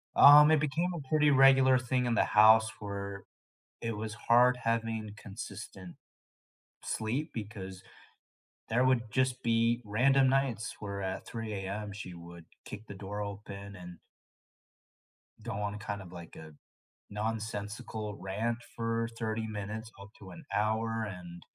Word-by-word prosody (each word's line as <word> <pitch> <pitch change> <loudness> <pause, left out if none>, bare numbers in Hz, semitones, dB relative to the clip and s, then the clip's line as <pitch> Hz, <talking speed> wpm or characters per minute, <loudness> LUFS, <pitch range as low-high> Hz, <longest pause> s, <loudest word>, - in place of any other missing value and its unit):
um, 150 +2 +9
it 155 - +5
became 155 +5 0
a 150 -6 -7
pretty 150 0 +4
regular 135 -1 +6
thing 125 0 0
in 120 -1 +1
the - - +4
house 110 +1 +6
where 100 -1 -6 0.6
it 115 -2 -3
was 110 0 -4
hard 125 +2 +4
having 115 -2 -1
consistent 100 -3 -9 0.9
sleep, 125 +9 -2
because 100 -4 -7 0.9
there 120 +3 +2
would 120 -3 +2
just 130 +1 0
be 115 +1 +2
random 130 +6 +3
nights 130 -4 0
where 100 -1 -5
at 95 0 -4
3 115 -2 -5
a.m. 100 +2 -4
she 100 -3 -8
would 85 0 -11 0.2
kick 105 +1 -9
the - - -8
door 100 +1 -6
open, 100 0 -7
and 90 -1 -10 1.5
go - - -4
on 105 +1 -3
kind 100 -1 -5
of 90 -2 -11
like 85 -2 -10
a 80 -1 -11 0.6
nonsensical 110 0 -4
rant 110 +5 -2 0.2
for 115 0 -1
30 110 -1 -2
minutes 110 +2 -6
up 100 0 -11
to 95 - -11
an 90 - -11
hour, 110 +2 0
and 90 -2 -9
110 Hz, 140 wpm, -31 LUFS, 100-120 Hz, 1.5 s, um